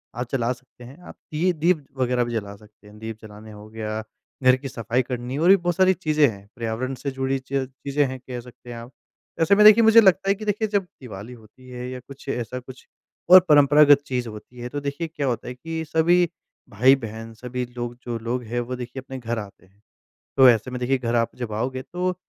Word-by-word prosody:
आप 125 0 -4
जला 125 -2 0
सकते 125 -1 -18
हैं, 130 +4 -12
आप - - -12 0.2
दीये, 175 +4 +1
दीप 160 -2 +1
वगैरह 125 -1 +1
भी 120 - -5
जला 100 -2 -4
सकते 105 0 -20
हैं। 105 - -15
दीप 110 -1 -6
जलाने 110 0 -12
हो 105 0 -12
गया, 110 0 -4 0.4
घर 130 0 +6
की 135 +1 -7
सफाई 115 +1 -1
करनी 125 +2 -4
और 170 +4 +3
भी 195 - +9
बहुत 175 -1 -1
सारी 190 +1 +4
चीज़ें 155 -5 +2
हैं, 100 -3 -7
पर्यावरण 120 +3 -3
से 140 - -2
जुड़ी 135 0 -1
च 130 +1 -14
चीज़ें 140 +2 -2
हैं, 130 0 -5
कह 125 -1 -7
सकते 120 0 -14
हैं 120 - -7
आप। 120 +3 -10 0.5
ऐसे 200 +5 +5
में, 210 - +5
देखिए, 215 +2 +9
मुझे 225 +1 +8
लगता 190 -1 +3
है 200 - +3
कि 215 +2 -8
देखिए, 210 +1 0
जब 200 -2 0 0.2
दिवाली 110 0 -9
होती 120 +3 -17
है, 125 0 -6
या 130 0 -6
कुछ, 140 +2 -14
ऐसा 125 0 -3
कुछ, 130 +1 -13 0.4
और 185 +1 +11
परंपरागत 145 0 +6
चीज़ 125 -3 -3
होती 110 +3 -12
है, 120 +1 -5
तो 145 - -4
देखिए, 145 +4 -3
क्या 150 -3 -3
होता 120 - -2
है 125 - -5
कि 160 +4 -5
सभी 170 +1 +3 0.4
भाई-बहन, 115 -1 +1
सभी 125 +2 -5
लोग, 120 0 -4
जो 120 -1 -3
लोग 120 +2 -3
हैं, 120 +2 -3
वो 120 +1 -4
देखिए 125 +1 -7
अपने 130 0 -8
घर 120 -1 -3
आते 100 -2 -11
हैं। 100 +2 -30 0.6
तो 130 -1 +8
ऐसे 120 +1 +3
में, 125 0 -5
देखिए, 130 +2 +1
घर 120 -1 -2
आप 115 -1 0
जब 110 - -7
आओगे, 130 +4 -3
तो 180 +3 -3
125 Hz, 230 wpm, -23 LUFS, 115-145 Hz, 0.6 s, और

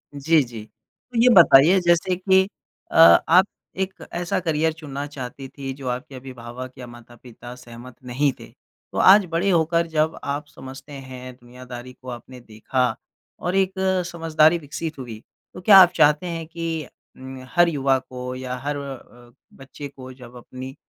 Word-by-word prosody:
जी, 155 +3 +3
जी। 115 -3 -9
तो 235 - -14
ये 250 - +6
बताइए 170 0 +7
जैसे 175 +1 +2
कि 190 +1 +3 0.4
अ, - - -7
आप 165 +2 +7 0.3
एक 190 0 -2 0.2
ऐसा 175 +1 -2
करियर 160 -2 0
चुनना 145 -3 -7
चाहती 135 -1 -8
थीं, 135 0 -7
जो 135 -1 -9
आपके 130 +3 -5
अभिभावक 125 -1 -9
या 125 -1 -9
माता-पिता 120 0 -13
सहमत 120 0 -13
नहीं 135 +3 0
थे। - - -11 0.4
तो - - -7
आज 195 +1 +7
बड़े 170 +4 0
होकर 170 -1 +2
जब 160 0 -1
आप 145 +1 -3
समझते 130 +1 -12
हैं, 130 -2 -9
दुनियादारी 125 0 -11
को 130 - -9
आपने 125 +1 -9
देखा 120 +3 -3 0.6
और 180 +2 -2
एक 190 -1 +1 0.4
समझदारी 165 0 +3
विकसित 160 +1 -6
हुई, 115 -4 -8 0.3
तो 180 - -10
क्या 195 +2 +7
आप 180 -2 +7
चाहते 150 +4 +3
हैं 165 -1 -5
कि 165 -2 -4 0.3
उम, 130 0 -9 0.2
हर 175 0 +5
युवा 135 -4 +1
को 125 0 -8
या 130 0 -5
हर 145 0 -2
अ, 125 -3 -10 0.2
बच्चे 135 +1 -10
को 130 -2 -12
जब 125 -1 -14
अपनी 130 +2 -10
140 Hz, 165 wpm, -22 LUFS, 125-165 Hz, 0.6 s, बताइए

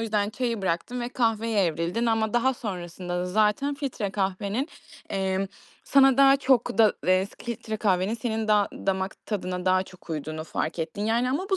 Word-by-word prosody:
yüzden 210 -2 0
çayı 235 -2 -2
bıraktın 190 +8 -1
ve 240 - -2
kahveye 225 -4 +1
evrildin 170 +8 -1
ama 225 -1 +1
daha 260 +2 +3
sonrasında 180 -5 -5
da 180 - -1
zaten 215 +9 +2
filtre 270 -8 -3
kahvenin, 200 - -1 0.4
emm, 190 0 0 0.4
sana 270 -2 +5
daha 275 0 +7
çok 260 -5 +2
da 220 -2 +6
eee, 185 +1 +4 0.2
filtre 225 -2 -4
kahvenin 195 0 +1
senin 225 -2 -2
da 210 -1 +4
damak 190 0 -3
tadına 185 -4 -3
daha 185 0 +3
çok 185 -2 -14
uyduğunu 155 0 -4
fark 160 +1 -3
ettin, 170 +6 -3
yani. 235 +3 +1
Ama 315 +9 -1
bu 385 - +3
210 Hz, 170 wpm, -26 LUFS, 185-235 Hz, 0.4 s, daha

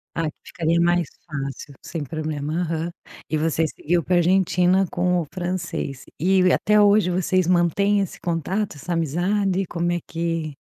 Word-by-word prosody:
Ah, 165 - 0
que - - -17
ficaria 170 0 0
mais 175 -2 +2 0.2
fácil, 140 -1 -5
sem 165 -3 -4
problema. 155 +2 -3
Aham. 165 0 -2 0.4
E 155 - 0
você 160 +1 +1
seguiu 170 +3 -1
para 180 - +1
a - - +5
Argentina 180 +1 +3
com 180 0 +1
o - - -5
francês 175 -7 -4 0.2
e 185 +1 +4
até 210 +1 +4
hoje 205 -2 +5
vocês 185 0 +1
mantém 185 +4 +3
esse 195 - -3
contato? 175 +4 -2
Essa 170 +5 -4
amizade? 185 +5 0
Como 175 0 -1
é 175 - 0
que 165 -3 -3
175 Hz, 165 wpm, -23 LUFS, 160-185 Hz, 0.4 s, a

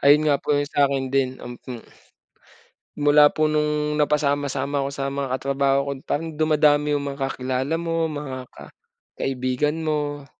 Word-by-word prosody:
Ayun 145 +2 +5
nga 140 -1 +2
po 145 - +1
yung 145 - +1
sa'kin 140 -2 +1
din, 130 -1 +1
um, 120 0 -8
hmm. 120 -3 -7 1.1
Mula 145 0 +6
po 155 +1 0
nung 150 0 0
napasama-sama 145 -1 0
ko 135 - -2
sa 140 0 -4
mga 140 -1 -2
katrabaho 135 +1 +1
ko 140 - -2
parang 160 +2 -3
dumadami 150 -1 +3
yung 140 - -4
mga 140 - -11
kakilala 130 +4 -2
mo, 165 -1 -1
mga 135 -4 -6
ka - - -13 0.5
kaibigan 135 +5 -1
mo. 145 -2 -2
145 Hz, 155 wpm, -23 LUFS, 135-150 Hz, 1.1 s, Mula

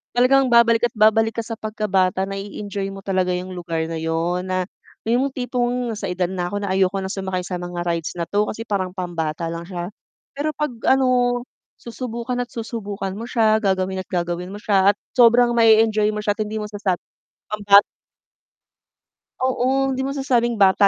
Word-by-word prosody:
talagang 260 +1 +4
babalik 235 0 +5
at - - -39
babalik 220 +1 +4
ka 230 - -1
sa 230 - -5
pagkabata, 195 -4 0
na 195 - -6
i-enjoy 200 0 -5
mo 195 0 -10
talaga 185 -2 +1
yung 185 +1 -5
lugar 165 -2 -3
na 165 0 -5
yun 165 +2 -1
na 185 0 0 0.4
yung 245 +5 +2
tipong 245 -2 -2
sa 205 - -4
edad 180 0 0
na 180 -1 -3
ako 205 +1 -3
na 190 - -1
ayoko 190 0 +2
na 190 0 -3
sumakay 190 -2 -3
sa 180 -2 -4
mga 175 0 -5
rides 170 0 -2
na 170 - -1
'to 205 +3 0
kasi 225 +1 -5
parang 195 -4 -1
pambata 170 -3 -3
lang 170 - -5
siya. 180 +1 -5 0.4
Pero 285 +2 -2
'pag 300 -2 -2 0.2
ano 265 0 +4 0.7
susubukan 240 +1 -4
at 245 - -5
susubukan 205 -4 -5
mo 230 +4 -7
siya, 220 -2 +3
gagawin 190 -1 0
at - - -14
gagawin 175 0 -2
mo 200 - -7
siya, 200 -2 +3
at - - -70 0.2
sobrang 240 -1 +5
ma-enjoy 220 -2 +4
mo 210 0 -4
siya, 205 - +2
at 215 - -5
hindi 215 +1 -3
mo 210 - -3
masasabing 205 -4 -2 0.5
pambata 205 -1 +6 1.6
Oo, 260 +1 +1
hindi 260 - -3
masasabing 250 -4 +1
bata 200 0 +5
205 Hz, 180 wpm, -21 LUFS, 185-235 Hz, 1.6 s, pambata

